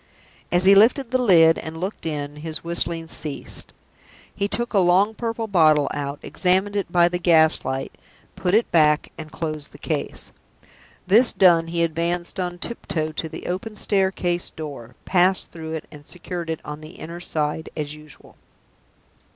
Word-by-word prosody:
As 175 +1 +2
he 195 - +8
lifted 230 +5 +4
the 255 - +2
lid 165 -8 +6
and 160 0 -7
looked 185 -1 -4
in, 145 -1 -4
his 155 +1 -6
whistling 170 -1 -2
ceased. 150 -3 -6 0.6
He 200 - -1
took 240 +3 -1
a 200 - +4
long 190 +4 +3
purple 230 0 -3
bottle 155 -8 +4
out, 140 0 -4
examined 190 +2 +1
it 195 -4 -2
by 175 -1 +5
the 175 0 -2
gas 160 -3 +4
light, 130 0 -3 0.4
put 180 +2 0
it 230 - +2
back, 150 -2 +3
and 155 -2 -9
closed 155 -3 -5
the - - -11
case. - - -4 0.7
This 225 +7 +5
done, 170 -3 +4
he 170 0 0
advanced 170 +2 -2
on 175 -1 -3
tiptoe 160 -7 -3
to 160 +1 -4
the 160 - -8
open 210 +5 -4
staircase 190 -4 0
door, 135 -6 -9
passed 185 0 +2
through 160 -1 -7
it, 160 - -5
and 145 -1 -12
secured 175 -1 -6
it 160 - -3
on 150 +1 -7
the 155 +3 -11
inner 170 +2 -8
side 155 -2 -3
as 150 -1 -3
usual. 150 -1 -15
170 Hz, 165 wpm, -23 LUFS, 155-190 Hz, 0.7 s, he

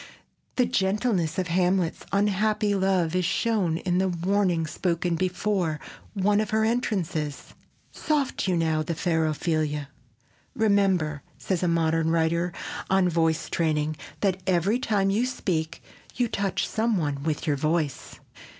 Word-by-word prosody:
The 250 - +3
gentleness 195 -5 0
of 185 -2 -1
Hamlet's 180 0 +1
unhappy 205 +1 +1
love 190 -4 +1
is 185 - +2
shown 190 -3 +1
in 180 +1 0
the 190 - +2
warning 180 -1 +1
spoken 170 +1 -1
before 185 -2 -1 0.4
one 205 +2 +2
of 215 - -3
her 220 0 +2
entrances: 180 - -2 0.4
"Soft 290 -9 -1
you 180 -2 +2
now, 160 -1 +1
the 165 +2 -3
fair 160 -2 +1
Ophelia." 155 -2 -1 0.7
"Remember," 195 - +2 0.2
says 185 -3 -2
a 180 - +1
modern 165 -1 +2
writer 170 +2 +1 0.4
on 190 -1 +3
voice 165 -1 +1
training: 155 -2 0 0.3
"that 190 -2 +1
every 190 +6 +2
time 200 -5 +1
you 215 +5 +2
speak 165 -10 -2 0.3
you 245 -1 +1
touch 200 -3 -1
some 225 -1 0
one 145 -4 -2
with 155 +1 -2
your 150 -3 +1
voice." 155 0 -1
180 Hz, 140 wpm, -26 LUFS, 160-200 Hz, 0.7 s, The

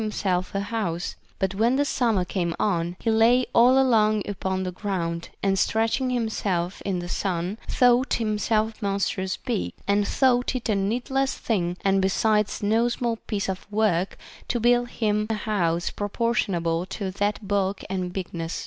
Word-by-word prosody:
himself 195 -4 -1
a 195 - +1
house; 200 -5 -3 0.2
but 190 0 -1
when 240 +8 +2
summer 225 -9 +1
came 175 -2 -2
on, 175 -3 0
he 225 - 0
lay 235 +3 +4
all 250 +3 +6
along 215 -5 +3
upon 190 -1 -2
the 185 - -3
ground, 170 -3 -3
and 195 -1 +2
stretching 225 +6 +1
himself 200 -7 -1
in 195 -2 -2
the 175 0 -4
sun 180 +1 -2
thought 250 +1 +3
himself 215 0 0
monstrous 195 -2 -1
big, 90 -1 -3
and 200 0 +2
thought 255 -1 +2
it 250 - -3
a 215 - +2
needless 245 +7 0
thing 180 -6 -1
and 195 0 +3
besides 210 +2 +1
no 225 +3 +3
small 235 -1 -1
piece 205 -2 -1
of 190 +2 -5
work 205 -4 +1 0.3
to 240 - 0
build 240 +1 +3
him 210 -2 0
a 220 - 0
house 175 -6 0
proportionable 200 -6 0
to 195 0 -4
that 205 +1 -2
bulk 200 -1 0
and 185 -2 -3
bigness. 175 -3 -4
205 Hz, 160 wpm, -25 LUFS, 185-225 Hz, 0.3 s, all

